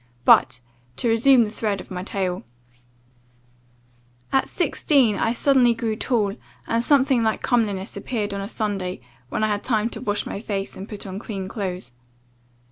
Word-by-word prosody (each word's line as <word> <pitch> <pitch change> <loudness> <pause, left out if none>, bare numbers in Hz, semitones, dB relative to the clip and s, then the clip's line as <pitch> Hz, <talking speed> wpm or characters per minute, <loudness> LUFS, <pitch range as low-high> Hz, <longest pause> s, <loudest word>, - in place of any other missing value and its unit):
But, - - +5 0.3
to 235 - -1
resume 235 +2 +5
the 210 - -3
thread 210 -3 -2
of - - -11
my 180 -1 -4
tale 185 -1 -2 1.9
"At 270 - +2
sixteen, 275 - +2
I 225 - +1
suddenly 245 -1 +4
grew 225 -1 -2
tall, 215 -3 0 0.3
and 230 +1 0
something 265 -2 +3
like 220 -1 0
comeliness 210 -6 0
appeared 205 0 -3
on 200 - -3
a 195 - -4
Sunday, 200 - -3 0.3
when 215 - -1
I - - +3
had 205 -1 -1
time 225 -1 0
to - - -6
wash 205 -4 -1
my - - -5
face, 200 -3 -4
and 195 +3 -8
put 210 -2 -7
on 190 0 -5
clean 195 -4 -5
clothes. 185 - -4
215 Hz, 165 wpm, -23 LUFS, 195-235 Hz, 1.9 s, But